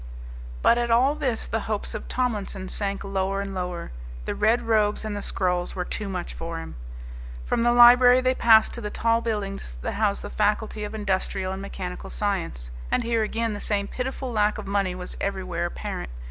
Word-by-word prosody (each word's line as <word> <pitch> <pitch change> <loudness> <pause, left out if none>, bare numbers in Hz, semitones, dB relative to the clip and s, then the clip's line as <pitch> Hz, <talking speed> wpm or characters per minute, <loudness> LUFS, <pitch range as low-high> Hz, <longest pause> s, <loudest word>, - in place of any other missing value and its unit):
But 235 - +5
at 240 0 0
all 250 +5 +4
this 260 -6 -1
the 225 - -1
hopes 210 -2 -1
of - - -6
Tomlinson 205 -6 -2
sank 200 -1 -2
lower 195 0 -1
and 200 0 -4
lower. 180 - -4 0.3
The - - -2
red 225 +3 +2
robes 215 -2 +2
and 215 -1 -3
the 205 - -3
scrolls 180 -2 -1
were 180 -1 -2
too 205 +1 -4
much 180 -2 -4
for 165 0 -5
him. 165 - -7 0.7
From - - 0
the 240 +1 +4
library 245 +1 +8
they 255 0 +2
passed 225 -3 +5
to 235 - -5
the 210 - -3
tall 230 +2 +1
buildings 200 - -3
that - - -1
housed 205 -1 0
the - - -6
faculty 210 0 0
of 210 +1 -5
industrial 190 -2 -1
and 190 - -5
mechanical - - -6
science. - - -3 0.2
And - - +1
here 230 -1 +1
again 225 +1 -1
the 205 - -5
same 200 -1 -1
pitiful 260 +1 -4
lack 210 -2 +2
of - - -6
money 195 -2 0
was 180 0 -6
everywhere 185 -3 -2
apparent. 115 - -5
205 Hz, 195 wpm, -25 LUFS, 190-230 Hz, 0.7 s, library